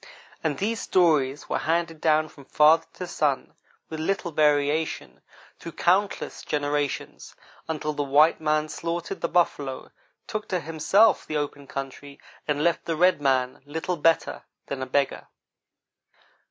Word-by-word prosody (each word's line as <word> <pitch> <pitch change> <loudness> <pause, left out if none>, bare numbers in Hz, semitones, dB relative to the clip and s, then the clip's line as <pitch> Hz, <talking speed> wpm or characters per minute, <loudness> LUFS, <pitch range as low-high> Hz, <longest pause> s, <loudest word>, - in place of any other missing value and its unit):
And 150 -3 -1
these 225 +3 -1
stories 150 -6 +2
were - - -1
handed 165 -1 -1
down 155 -1 +3
from 140 -2 -16
father 160 +3 +4
to 180 - -6
son, 150 -5 -1 0.3
with 160 - -6
little 175 +1 -1
variation, 150 +1 +1 0.4
through 170 - -8
countless 190 +3 0
generations, 145 -1 -3 0.3
until 155 -1 -2
the 145 - -2
white 145 +4 +4
man 155 0 +1
slaughtered 170 +2 -4
the - - 0
buffalo, 145 -6 -1 0.3
took 215 -1 -5
to 185 - -1
himself 165 +6 +3
the 155 - -2
open 145 -1 -4
country, 140 +1 -7 0.3
and 150 0 0
left 170 0 +1
the 165 - -1
red 180 -1 +3
man 130 -2 +1
little 160 +5 -3
better 165 0 +1 0.2
than 140 -1 -5
a 130 - -3
beggar. 140 +1 -1
155 Hz, 140 wpm, -25 LUFS, 145-170 Hz, 0.4 s, father